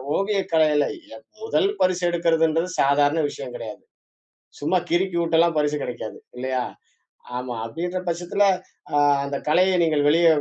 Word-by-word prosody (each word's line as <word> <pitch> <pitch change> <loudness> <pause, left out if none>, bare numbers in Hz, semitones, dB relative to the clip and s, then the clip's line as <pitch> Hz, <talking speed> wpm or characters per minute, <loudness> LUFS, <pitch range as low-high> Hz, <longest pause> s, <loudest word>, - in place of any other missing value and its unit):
ஓவிய 200 +1 0
கலைல 155 -2 +4 0.3
எப் - - -15 0.2
முதல் 405 -3 +1
பரிசு 185 -1 +2
எடுக்குறதுன்றது 165 0 +1
சாதாரண 145 +3 +3
விஷயம் - - -8
கிடையாது. - - -8 0.8
சும்மா 185 - +1
கிறுக்கிவுட்டெல்லாம் 170 -2 +2
பரிசு 150 0 +1
கெடைக்காது 120 -3 -6 0.2
இல்லையா? 130 0 -2 0.7
ஆமா. 125 -1 -4
அப்டீன்ற 175 +10 -4
பட்சத்துல, 175 +4 0 0.5
அ - - -1 0.3
அந்த 140 0 -4
கலையை 185 +4 +4
நீங்கள் 150 -3 +1
வெளிய 165 +3 +4
165 Hz, 125 wpm, -23 LUFS, 145-180 Hz, 0.8 s, கலைல